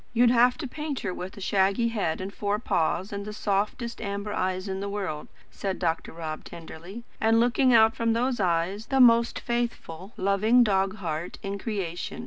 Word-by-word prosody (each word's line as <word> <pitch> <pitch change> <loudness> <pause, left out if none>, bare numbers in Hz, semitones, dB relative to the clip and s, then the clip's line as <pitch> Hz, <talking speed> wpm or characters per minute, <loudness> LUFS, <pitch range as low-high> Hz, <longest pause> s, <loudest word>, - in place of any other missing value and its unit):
"You'd 240 0 +5
have 245 +1 +4
to 310 - -4
paint 300 +1 -4
her 185 - -3
with 185 +3 -7
a - - -9
shaggy 195 +4 +2
head, 195 -3 -2
four 205 0 -1
paws, 190 -1 -1
and 200 0 -4
the 210 - -6
softest 210 +4 -2
amber 200 0 -4
eyes 185 +1 -1
in 190 0 -3
the 200 +1 -3
world," 190 -7 -4 0.2
said 195 -2 -3
Dr. 165 -2 -1
Rob 160 -2 -6
tenderly; 170 +6 -10 0.2
"and, 225 +1 +3
looking 245 +2 +3
out 225 -1 +6
from 230 -1 +1
those 245 +1 0
eyes, 185 +3 0
the 270 - +1
most 235 -2 +5
faithful, 235 -6 -4
loving 210 +6 +4
dog 195 -2 +1
heart 170 -4 -4
in 200 0 -4
creation. 190 -6 -4
200 Hz, 180 wpm, -26 LUFS, 185-235 Hz, 0.2 s, out